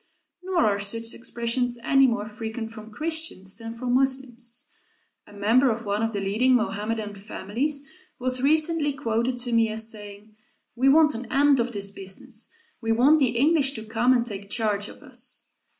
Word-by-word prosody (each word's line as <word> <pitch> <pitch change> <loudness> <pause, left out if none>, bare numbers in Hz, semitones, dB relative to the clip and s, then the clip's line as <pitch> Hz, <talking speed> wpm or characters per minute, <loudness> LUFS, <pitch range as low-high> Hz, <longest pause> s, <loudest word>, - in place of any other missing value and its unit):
Nor 360 -2 +1
are 200 -1 +2
such 230 +3 -1
expressions 240 +1 -1
any 270 +1 +5
more 230 -3 -1
frequent 220 +1 -6
from 220 -1 -10
Christians 310 - -2
than 225 0 -7
from 245 +1 -2
Moslems. 255 -2 -1 0.6
A - - -15
member 225 +6 +3
of 230 0 -2
one 205 +1 0
of 225 0 0
the 205 - -2
leading 220 +7 +3
Mohammedan 215 -1 -1
families 230 +8 -3 0.3
was 255 0 0
recently 310 +1 +2
quoted 245 -2 -1
to 245 0 -2
me 230 -1 +3
as 220 +1 -3
saying: 210 0 -11 0.4
"We 260 +3 +4
want 305 +1 +6
an 240 +1 -7
end 280 0 +4
of 240 +1 0
this 200 -3 -1
business. 205 +5 -5 0.3
We 225 -1 0
want 270 +7 +5
the 245 -4 +2
English 280 0 +3
to 220 -3 -6
come 230 +3 +2
and 240 -2 +3
take 200 -3 -6
charge 210 -2 0
of - - -13
us." - - -4
235 Hz, 175 wpm, -25 LUFS, 215-260 Hz, 0.6 s, want